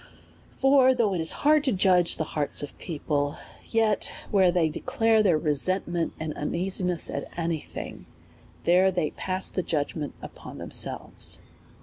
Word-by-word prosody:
For 270 -1 +5
though 215 -5 +1
it 175 - -1
is 160 - +1
hard 305 0 +5
to 265 - +2
judge 185 -3 +4
of - - -6
the - - 0
hearts 150 -2 -1
of 145 - -7
peo 165 -4 -5
ple, 145 -1 0 0.3
yet 220 -3 +1 0.2
where 190 -3 +5
they 175 -2 +2
declare 225 - +1
their 180 -7 +3
resentment 165 +3 0
and 160 -1 -4
un 150 - -3
easiness 180 -1 0
at 140 - -4
any 165 -2 -1
thing, - - -9 0.6
there 180 +2 +4
they 175 -5 -1
pass 185 0 -1
the 185 - -1
judgment 150 -2 -3
upon - - -10
themselves. - - -2
180 Hz, 160 wpm, -26 LUFS, 160-200 Hz, 0.6 s, For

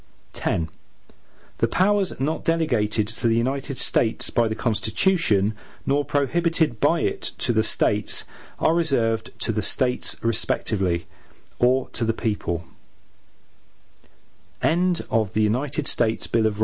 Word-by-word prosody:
X 85 - +1 1.0
The 115 - +3
powers 195 - +1
not 150 +4 -1
delegated 120 -11 +1
to 115 +1 -2
the 115 - +3
United 135 +3 -1
States 115 -1 +1
by 120 -1 +2
the 110 - -2
Constitution, 110 - +1 0.3
nor 145 +1 +2
prohibited 150 -1 +1
by - - +3
it - - -1 0.2
to 120 - +1
the 110 - +3
States, 105 -1 +1 0.3
are 160 - +2
reserved 120 -9 +1
to - - +1
the 110 0 -1
States 125 +4 +1
respectively, 100 -6 0 0.5
or 125 +1 +3
to - - -2
the 115 0 +1
people. 100 -7 -2
115 Hz, 105 wpm, -23 LUFS, 110-145 Hz, 1.0 s, The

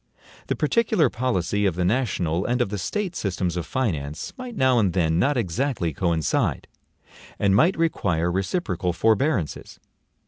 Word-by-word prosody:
The - - 0
particular 170 - +2
policy 105 -4 0
of 90 - -1
the 90 0 0
national 95 -6 0
and 120 +1 0
of 120 - +1
the 105 0 -4
State 190 - -3
systems 90 -3 -2
of 85 - -3
finance 80 - -3
might 255 -3 -8
now 130 - +3
and 100 -5 +1
then 80 -2 +1
not 140 +6 +2
exactly 110 - -1
coincide, 85 -1 0 0.7
and 100 -1 +2
might 170 - +4
require 90 - 0
reciprocal 95 - -1
forbearances. 110 - 0
100 Hz, 145 wpm, -24 LUFS, 85-130 Hz, 0.7 s, might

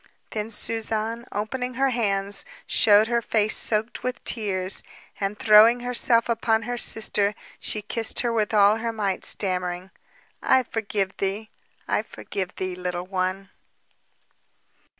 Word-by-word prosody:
Then 215 0 -4
Suzanne, 225 +1 -1
opening 250 +4 -4
her 270 +1 +1
hands, 200 -4 +1 0.2
showed 210 0 +4
her 235 0 0
face 215 -2 +1
soaked 220 +1 +2
with 255 0 -5
tears, 190 -4 0 0.4
and 200 +1 -3
throwing 225 +3 +6
herself 240 -1 +2
upon 225 -1 0
her 245 +2 -4
sister, 210 -3 +3 0.2
she 215 - -2
kissed 225 +1 -1
her 240 -1 -1
with 215 -2 0
all 210 0 +4
her 230 +1 -3
might, 205 -4 -3
stammering: 180 -1 -2 0.5
"I 260 -1 +3
forgive 205 -5 -3
thee, 200 +3 -4 0.4
I - - 0
forgive 190 -3 -7
thee, 185 -1 -4
Little 180 0 -5
One." 185 +1 -3
215 Hz, 130 wpm, -24 LUFS, 195-230 Hz, 0.5 s, throwing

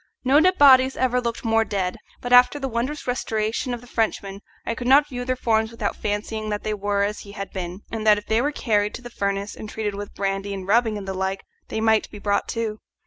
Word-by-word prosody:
No 270 +3 +5
dead 370 +3 +3
bodies 265 -2 +6
ever 250 -1 +1
looked 235 0 -4
more 225 0 +3
dead, 190 -4 -2 0.2
but 245 0 -1
after 250 +3 +7
the 270 -2 -3
wondrous 255 +5 -3
restoration 230 0 -1
of 240 -1 -4
the - - -14
Frenchman 200 -4 -2 0.2
I - - -1
could 240 +1 -5
not 280 +3 +6
view 245 -2 -5
their 255 0 0
forms 220 -3 +1
without 225 -3 -3
fancying 215 +1 -3
that 210 -1 -3
they 215 - -1
were 200 0 0
but 200 - +2
as 210 - -7
he 200 - -11
had 195 -1 -6
been, 180 0 -5
and 225 -1 -3
that 210 -1 +7
if 210 - -7
they 220 +2 +2
were 290 +3 0
carried 210 -7 0
to 250 - -9
the 240 - -9
furnace 200 -1 -2
and 215 - -8
treated 210 -2 -3
with 205 0 -7
brandy 195 0 -2
and 190 -1 -7
rubbing 225 0 +3
and 195 -1 -7
the 190 - -2
like 190 +1 -2 0.2
they 220 - -3
might 220 -1 +3
be 210 - -10
brought 200 0 0
to. 220 -2 -3
220 Hz, 250 wpm, -23 LUFS, 205-245 Hz, 0.2 s, after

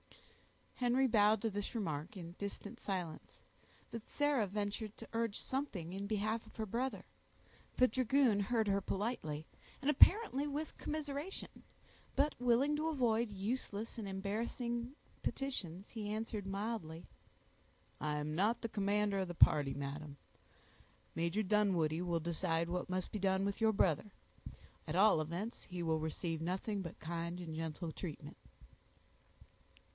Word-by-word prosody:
Henry 250 +2 +3
bowed 215 -3 +4
to 225 - +2
this 205 +3 -3
remark 165 -3 -2
in 170 -2 -6
distant 205 +3 -5
silence, 180 -5 -4 0.5
but 230 -1 -7
Sarah 290 -7 +2
ventured 205 +2 -3
to 225 - -8
urge 230 -2 0
something 215 - -3
in 200 +1 -3
behalf 215 +2 0
of - - -16
her 220 - -2
brother. 245 +6 -2 0.7
The 255 - +7
dragoon 255 -2 +3
heard 220 +2 +1
her 200 0 +2
politely, 190 -8 -2 0.3
and 285 - +3
apparently 300 - +6
with 295 +2 -3
commiseration; 300 +3 -4 0.5
but 285 +2 +3
willing 250 +4 +4
to 310 +1 0
avoid 240 -7 +2
useless 210 +2 -3
and 210 - -4
embarrassing 235 +5 -2 0.3
petitions, 200 -9 -3
he 215 -3 -4
answered 215 -2 -3
mildly,— 195 -5 -3 0.9
"I 150 +1 -1
am 150 +1 -2
not 205 +8 +2
the 230 - -2
commander 205 -1 +1
of 190 - 0
the 175 - -5
party, 140 -4 +5
madam; 140 +1 -5 1.0
Major 170 +6 0
Dunwoodie 185 -6 +2
will 170 -2 +1
decide 165 0 0
what 180 +1 -2
must 185 0 -1
be 210 - -3
done 190 0 +2
with 200 +2 -2
your 220 0 +5
brother; 195 -1 +2 0.8
at 155 - -2
all 195 -4 +6
events 175 +9 -4
he 180 -2 -4
will 160 -1 +2
receive 160 +1 -2
nothing 190 +4 -1
but 170 -3 -7
kind 170 +2 -3
and 165 -3 -5
gentle 160 +1 -3
treatment." 160 -2 -6
205 Hz, 140 wpm, -36 LUFS, 170-230 Hz, 1.0 s, The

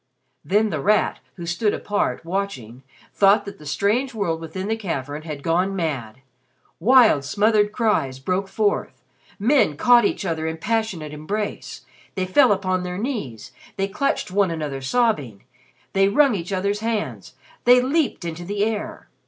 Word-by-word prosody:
Then 210 +7 +2
The 155 - -2
Rat, 210 +5 +2 0.2
who 175 - -7
stood 185 +5 0
apart, 205 -4 -2
watching, 165 - -4 0.3
thought 200 +1 +4
that 200 - -9
the 150 - -11
strange 230 - 0
world 165 -6 -1
within 185 +4 -5
the 220 - 0
cavern 150 -8 -4
had 150 -3 -7
gone 180 +4 +1
mad! 135 - -3 0.6
Wild 235 - +5
smothered 210 +6 +2
cries 210 - 0
broke 185 +8 -2
forth, 205 +1 -1 0.3
men 225 - +2
caught 245 +4 +5
each 205 - -1
other 160 -2 -2
in 160 0 -3
passionate 200 -6 -2
embrace, 200 +8 -5 0.3
they 185 -1 -1
fell 245 +7 +4
upon 185 -2 0
their 180 0 -4
knees, 205 - -4 0.3
they 195 0 0
clutched 210 0 -1
one 200 -1 +2
another 150 -5 -4
sobbing, 145 - 0 0.5
they 195 0 +4
wrung 275 +4 +4
each 180 -1 -4
other's 200 +2 -1
hands, 225 -1 -3 0.3
they 245 +1 +7
leaped 270 - 0
into 170 +1 -5
the 200 +3 -1
air. 215 -2 -4
195 Hz, 155 wpm, -22 LUFS, 160-215 Hz, 0.6 s, they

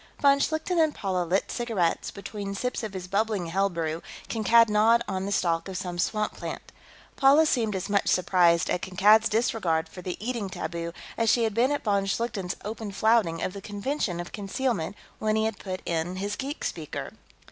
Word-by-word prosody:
Von 280 -1 +5
Schlichten 315 +4 0
and 315 -2 +3
Paula 185 -3 -1
lit 185 +4 0
cigarettes; 225 -8 0
between 200 0 -6
sips 250 +5 -2
of 215 -3 -5
his 185 -1 -5
bubbling 200 -1 0
hell 195 +4 +1
brew, 165 -2 -3 0.3
Kankad 230 +1 +5
gnawed 220 +3 +4
on 190 +1 -2
the - - -3
stalk 170 -3 +1
of 190 -1 -5
some 180 -2 -4
swamp 215 +3 0
plant. - - -7 0.5
Paula 280 +4 +6
seemed 225 -8 +1
as 190 0 -3
much 200 -1 +1
surprised 175 -2 +3
at 180 - 0
Kankad's 205 +4 +4
disregard 195 -8 +1
for 180 - -10
the 180 0 -4
eating 230 -3 -3
taboo 170 -1 -4 0.3
as 225 -1 +3
she 235 - +4
had 220 -2 0
been 240 +5 +3
at 290 - -1
von 200 -2 +1
Schlichten's 200 -3 -2
open 215 -1 -5
flouting 200 -4 +2
of 185 - -2
the 200 - -7
convention 205 - -2
of 175 - -6
concealment 205 -3 -2 0.2
when 215 0 +1
he 220 0 +2
had 220 -2 -2
put 185 -2 -5
in 170 +2 -1
his 200 +2 -3
geek 280 +3 -5
speaker. - - -4
200 Hz, 190 wpm, -27 LUFS, 180-230 Hz, 0.5 s, Paula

